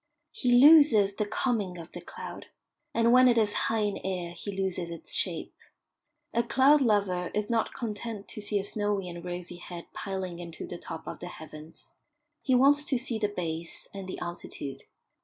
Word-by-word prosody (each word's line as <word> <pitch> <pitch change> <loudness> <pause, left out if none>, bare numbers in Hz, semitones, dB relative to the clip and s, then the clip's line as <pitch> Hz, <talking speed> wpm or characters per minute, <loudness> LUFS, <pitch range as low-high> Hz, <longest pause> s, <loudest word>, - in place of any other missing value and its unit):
He 250 - +1
loses 250 -7 +8
the 210 - 0
coming 210 -5 -1
of 165 0 -9
the 175 - -7
cloud, - - -8 0.4
and 230 +1 +3
when 255 0 +8
it 240 -1 +4
is 210 -2 +3 0.2
high 225 -1 +1
in 205 -1 -1
air 180 -2 -2
he 175 +4 -6
loses 190 -3 -2
its 170 -1 -8
shape. - - -1 0.8
A 235 - +3
cloud 270 +5 +5
lover 200 -7 +2
is 210 +2 0
not 225 -2 +1
content 220 -2 -5
to 215 - -7
see 205 0 -1
a 195 - -2
snowy 205 -2 -1
and 170 -1 -7
rosy 175 0 -6
head 175 -1 -8
piling 190 -3 -4
into 170 -2 -7
the 175 - -7
top 160 - -7
of - - -6
the 175 - -6
heavens; 155 -1 -8 0.5
he 260 - +2
wants 285 +3 +5
to 265 - +1
see 240 -2 -2
the 210 - +2
base 165 -4 -4
and 195 -1 -6
the - - -4
altitude. 175 -5 -6
200 Hz, 185 wpm, -29 LUFS, 175-230 Hz, 0.8 s, loses